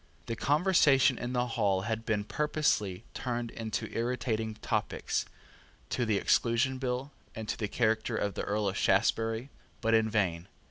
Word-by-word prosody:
The 115 - -3
conversation 145 - +4
in 120 +1 -3
the 125 0 +1
hall 105 -5 +1
had 110 +2 -3
been 105 -2 +1
purposely 110 -8 0
turned 120 -2 -3 0.2
to - - -3
irritating 115 -2 -1
topics, - - -1 0.7
to 120 -2 0
the 105 -2 +2
Exclusion 120 +5 +2
Bill, 130 +2 -2 0.2
and 110 -1 -6
to - - -1
the 105 - -2
character 110 +1 0
of 100 -2 -1
the - - -3
Earl 105 0 -1
of 95 - -1
Shaftesbury, 115 +6 +1 0.3
but 115 - +1
in 110 -1 +4
vain. 90 -6 0
115 Hz, 155 wpm, -30 LUFS, 105-125 Hz, 0.7 s, conversation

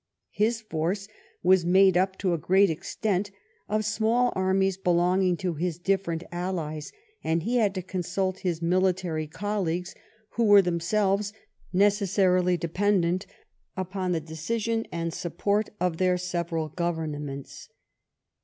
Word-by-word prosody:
His 225 +2 +1
force 190 0 -2 0.4
was 185 0 +5
made 190 +1 +5
up, 190 +1 +1
to 185 -3 0
a - - +1
great 190 +2 +4
extent, 200 +5 -2 0.4
of 215 0 0
small 225 +4 +2
armies 190 0 +2
belonging 180 0 +2
to 180 -1 -2
his 165 +1 -2
different 175 -2 -1
allies, 170 -4 -4 0.3
and 160 0 0
he 245 +5 0
had 205 -4 +2
to 185 - -3
consult 185 +1 -2
his 170 -3 -2
military 180 -3 +1
colleagues, 180 0 -2 0.4
who 230 +1 0
were 205 -2 +7
them 175 -1 0
selves 200 +3 +1 0.4
necessarily 190 -2 +3
dependent 185 +1 0 0.5
upon 185 0 -2
the 170 - +1
decision 225 +9 -2
and 170 0 -2
the - - -8
support 200 +4 -1
of 180 -2 0
their 185 0 +2
several 170 -3 -2
governments. 150 -4 -4
185 Hz, 135 wpm, -27 LUFS, 170-200 Hz, 0.5 s, were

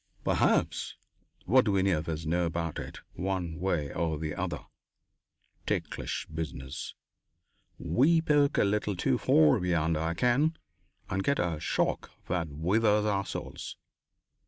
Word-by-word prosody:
"Perhaps. - - +1 0.5
What 130 +6 +5
do 100 -3 +2
any 95 +1 +3
of 80 -1 -1
us 80 0 -3
know 85 +2 +1
about 85 -1 -3
it, - - -8
one 90 -3 -3
way 85 -6 -1
or 80 -2 -1
the 75 0 -3
other? - - -3 1.1
Ticklish - - -2
business! 70 -5 -6 0.8
We 160 +6 +3
poke 145 -3 +3
a - - +5
little 105 0 0
too 85 - +1
far 75 -2 +5
beyond 85 -3 +1
our 80 +2 -1
ken 135 - +2 0.5
and 95 +1 -1
get 140 +5 +2
a 85 -3 -1
shock - - -1 0.2
that 85 -3 -1
withers 105 +8 +2
our 100 -1 0
souls. - - -6
90 Hz, 135 wpm, -29 LUFS, 80-105 Hz, 1.1 s, What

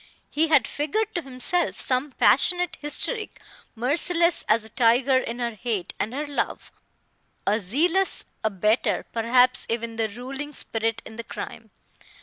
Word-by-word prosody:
He 320 +2 +2
had 300 -4 +4
figured 430 +10 -2
to 345 - -1
himself 270 +6 -1
some 260 +2 -1
passionate 355 +4 +3
hystérique, 425 +9 +1 0.4
merciless 335 +8 +3
as 220 +1 +3
a - - -8
tiger 245 +3 +3
in 235 -2 -5
her 240 -1 -2
hate 215 -3 -3
and 215 - -2
her 290 +4 -3
love, 285 -1 -3 0.7
a 210 +2 +2
zealous 325 - +1 0.2
abettor, 215 +2 +1
perhaps 245 +2 +3
even 230 0 -3
the 225 -1 +1
ruling 270 +7 -7
spirit 225 -2 -2
in 220 - -11
the 230 - -5
crime. 220 +1 -8
250 Hz, 140 wpm, -24 LUFS, 225-300 Hz, 0.7 s, had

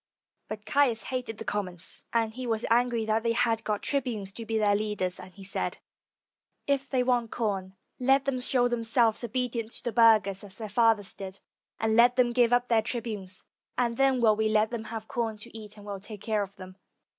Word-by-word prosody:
But 215 0 -7
Caius 265 -6 +2
hated 250 -4 -4
the 225 - -7
commons, 185 -5 -4
and 225 -1 +1
he 255 +1 -5
was 225 -1 -1
angry 235 -1 +2
that 220 +1 +1
they 230 0 +1
had 230 -2 +1
got 210 -2 -2
trib 280 -2 +1
unes 205 -6 -4
to 230 +1 -8
be 225 - 0
their 210 -1 +3
leaders, 205 -4 -2
and 185 0 -10
he 195 - -11
said, 190 - -2 0.9
"If 275 -1 0
they 255 -2 +2
want 245 -2 +1
com, 195 -5 -2 0.2
let 270 +2 +3
them 270 -2 0
show 250 -1 +3
themselves 230 -1 +2
obedient 235 -1 -2
to - - -5
the 240 - -1
burghers, 215 -4 +4
as 195 -2 -7
their 220 -2 -6
fathers 220 -2 +3
did, 190 0 -8 0.4
and 220 0 +1
let 240 +2 +6
them 245 -2 +3
give 240 -1 +4
up 245 0 +3
their 230 -2 +3
tribunes; 215 -5 -5 0.3
and 235 -2 +1
then 270 0 +3
will 220 -3 +5
we 215 0 +1
let 215 +1 +2
them 230 -2 -4
have 220 0 -6
com 230 -4 -2
to 210 - -11
eat, 215 -1 -9
and 205 - -12
will 200 -1 -5
take 205 0 -9
care 215 -2 0
of 200 0 -6
them." 185 -1 -11
225 Hz, 215 wpm, -28 LUFS, 210-240 Hz, 0.9 s, let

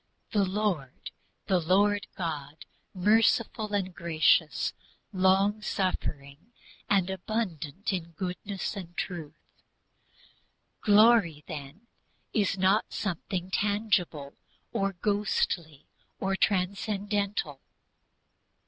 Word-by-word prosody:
the 205 -2 +3
Lord, 185 -9 -2 0.3
the 185 -3 +2
Lord 200 +4 +2
God, 155 -4 -5 0.3
merciful 215 +2 +2
and 190 -3 -1
gracious, 155 - +2 0.4
long 195 +3 +3
suffering 170 - -3 0.4
and 195 -3 +3
abundant 190 -3 -3
in 170 -2 -4
goodness 185 +4 -4
and 175 -3 -8
truth." 165 -5 -5 1.4
Glory 205 -7 +5
then 145 +6 -8 0.5
is 200 -3 +1
not 190 +3 +3
something 185 -1 -3
intangible, 190 -7 0 0.4
or 195 0 0
ghostly, 180 -6 -1 0.3
or 195 0 0
transcendental. 200 -4 -1
190 Hz, 85 wpm, -29 LUFS, 165-205 Hz, 1.4 s, Glory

